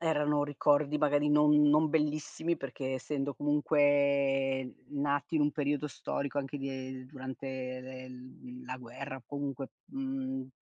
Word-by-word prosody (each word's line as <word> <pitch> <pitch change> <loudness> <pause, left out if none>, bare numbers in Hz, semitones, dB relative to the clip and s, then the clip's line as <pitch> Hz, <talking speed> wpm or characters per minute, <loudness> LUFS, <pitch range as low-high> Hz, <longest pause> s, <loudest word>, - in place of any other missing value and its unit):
erano 150 -3 +2
ricordi 145 +1 +2
magari 145 0 +3
non 150 0 +5 0.2
non 155 +2 +5
bellissimi, 155 +2 0
perché 135 -1 -4
essendo 140 +1 -2
comunque 140 -3 +2 0.2
nati 145 +1 -1
in 155 - +4
un 145 - +3
periodo 145 0 0
storico 140 +1 -3
anche 140 +1 -3
di 135 0 -4
ehm, 130 -1 -6
durante 130 0 -7 0.3
le 130 0 -8
l - - -9 0.3
mhmm, 125 0 -10
la 130 - -5
guerra 130 +3 -7
o 130 - -12
comunque 140 -2 -4 0.2
mhmm, 265 - -3
145 Hz, 145 wpm, -32 LUFS, 135-150 Hz, 0.3 s, non